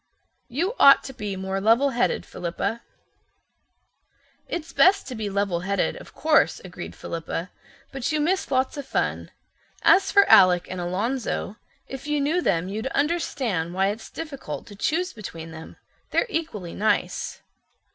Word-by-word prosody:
"You 330 - -1
ought 275 - +8
to 265 - -8
be 205 -5 -4
more 190 +1 -3
levelheaded, 245 +3 +2
Philippa." 180 +6 -3 1.7
"It's 335 -1 -5
best 390 +2 +4
to - - -5
be 220 -3 -3
levelheaded, 195 -1 0
of - - -15
course," 310 -2 +3
agreed 175 -2 -8
Philippa, 165 +1 -5 0.4
"but 270 +2 -2
you 310 - +1
miss 365 +6 0
lots 260 +1 0
of 280 -2 -6
fun. - - -1 0.5
As 390 0 +5
for 400 -1 +6
Alec 180 -2 +7
and 185 -1 -4
Alonzo, 210 +3 -2 0.3
if 270 +2 -8
you 295 0 +1
knew 310 +6 +1
them 180 - +1
you'd 215 +6 -3
understand 265 - -1
why 195 +1 +2
it's 215 +2 -6
difficult 305 -4 -6
to 205 - -12
choose 340 - -1
between 165 -7 -8
them. 160 0 -10 0.3
They're - - +2
equally 220 - -4
nice." 215 +2 -1
230 Hz, 145 wpm, -24 LUFS, 190-295 Hz, 1.7 s, ought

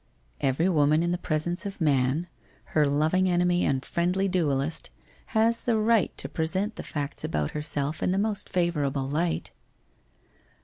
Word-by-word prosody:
* - - -27
Every 160 +7 +1
woman 155 -2 +3
in 175 - 0
the 175 - -1
presence 170 +1 -1
of 200 -1 -6
man, 145 0 +2 0.5
her 150 -2 +4
loving 160 +6 +2
enemy 175 0 +2
and 135 -1 0
friendly 180 +3 0
duellist, 155 -5 -1 0.4
has 230 0 +1
the 235 -2 +2
right 220 -1 +3
to - - -2
present 190 +7 -1
the - - -6
facts 145 -1 -4
about 75 -1 -1
herself 150 0 -1
in - - +1
the 190 - 0
most 205 0 -1
favourable 145 -7 0
light.' 160 +4 -1
170 Hz, 160 wpm, -27 LUFS, 145-185 Hz, 0.5 s, her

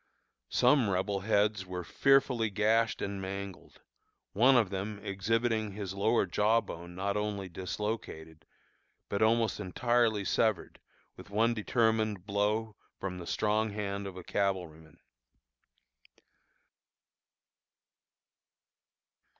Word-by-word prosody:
Some 125 -3 +4
Rebel 95 +1 0
heads 105 0 +1
were 90 -1 -5
fearfully 125 +1 +2
gashed 110 +2 +1
and 100 -1 -4
mangled, 95 0 -7 0.5
one 125 +6 +5
of 110 -6 +2
them 100 +2 -4
exhibiting 110 +2 0
his 100 -2 -5
lower 105 +3 +2
jaw 105 +5 +2
bone 85 -4 -9
not 100 +2 -2
only 105 -2 -2
dislocated, 90 -3 -5 0.6
but 100 - -2
almost 115 0 +2
entirely 110 +1 +1
severed 110 -1 0 0.4
with - - -13
one 115 +3 +2
determined 110 -3 0
blow 105 +2 0 0.2
from 90 -2 -4
the 85 - -8
strong 110 +1 +1
hand 100 -1 -3
of 95 -1 -8
a 90 - -8
cavalryman. 85 -6 -3
105 Hz, 105 wpm, -31 LUFS, 95-110 Hz, 0.6 s, one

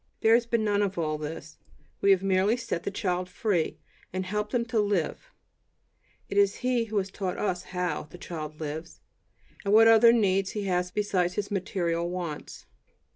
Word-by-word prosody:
There 225 - +5
has 235 0 +3
been 235 -2 +1
none 205 -1 +2
of 200 -2 -1
all 155 -2 -1
this; 155 +1 -7 0.4
we 200 - +3
have 195 -1 +5
merely 195 +4 +2
set 205 -8 -3
the - - -3
child 185 -2 -2
free, 180 -3 -1 0.3
and 185 +1 -3
helped 210 +2 -2
him 240 -2 0
to 225 -1 0
"live." 205 - -1 1.0
It 200 - +1
is 200 0 +4
he 245 -2 +2
who 215 -1 -3
has 195 -1 -1
taught 190 -3 -3
us 185 -3 -2
"how" 180 -4 -3
the 180 - -11
child 155 -3 -7
lives, 160 +2 -6 0.6
and 200 +1 +3
what 225 +1 +8
other 225 +1 +8
needs 195 -4 +2
he 210 - -3
has 180 -2 0
besides 180 -2 0
his 205 0 -3
material 170 -3 -1
wants. 175 -4 -6
195 Hz, 180 wpm, -27 LUFS, 180-210 Hz, 1.0 s, what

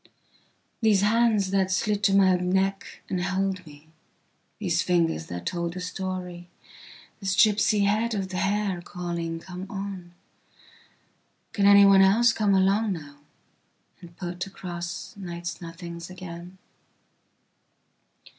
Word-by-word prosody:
These 215 -4 +4
hands 215 -2 +2
that 190 -1 +2
slid 200 +2 0
to 195 - +4
my 190 -2 +5
neck 190 +2 -1
and 185 -2 -2
held 190 0 -1
me, 145 +1 -15 0.7
these 175 -5 0
fingers 165 - 0
that 90 0 -6
told 170 0 -3
a - - -4
story, 180 -1 -5 0.7
this 190 -2 -1
gipsy 210 -1 +4
head 215 +3 +1
of 190 -2 -3
hair 195 0 -1
calling: 170 -2 -4
Come 180 +2 -8
on:can 195 +1 -7
anyone 200 -1 +7
else 220 +5 +5
come 205 -3 +2
along 195 +2 +2
nowand 150 +3 -16
put 180 +1 -5
across 175 +2 -7
night's 175 -3 -6
nothings 170 0 -8
again? 180 0 -9
185 Hz, 110 wpm, -26 LUFS, 175-200 Hz, 0.7 s, anyone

